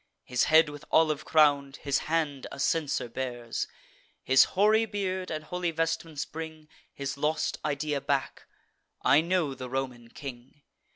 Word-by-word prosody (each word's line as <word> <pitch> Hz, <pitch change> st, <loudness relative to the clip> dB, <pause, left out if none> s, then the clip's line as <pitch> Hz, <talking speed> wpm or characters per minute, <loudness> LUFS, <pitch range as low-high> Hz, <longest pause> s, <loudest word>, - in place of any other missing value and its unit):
His 125 Hz, 0 st, +1 dB
head 160 Hz, 0 st, +6 dB
with 145 Hz, 0 st, -8 dB
olive 155 Hz, -2 st, +3 dB
crown'd, 145 Hz, -3 st, +3 dB
his 140 Hz, -2 st, 0 dB
hand 150 Hz, -4 st, 0 dB
a -, -, -8 dB
censer 150 Hz, -3 st, 0 dB
bears, 120 Hz, -1 st, -4 dB, 0.6 s
His 130 Hz, 0 st, +6 dB
hoary 215 Hz, +3 st, +4 dB
beard 190 Hz, -3 st, -2 dB
and 155 Hz, -1 st, -4 dB
holy 175 Hz, +2 st, -2 dB
vestments 165 Hz, -2 st, -2 dB
bring 160 Hz, -1 st, -8 dB, 0.2 s
His 140 Hz, 0 st, -5 dB
lost 150 Hz, +1 st, 0 dB
idea 145 Hz, -1 st, -1 dB
back: 135 Hz, -3 st, -2 dB, 0.6 s
I 145 Hz, -, +6 dB
know 170 Hz, -4 st, 0 dB
the 130 Hz, -1 st, -7 dB
Roman 130 Hz, -2 st, -4 dB
king. 130 Hz, +2 st, -10 dB
150 Hz, 140 wpm, -28 LUFS, 135-160 Hz, 0.6 s, head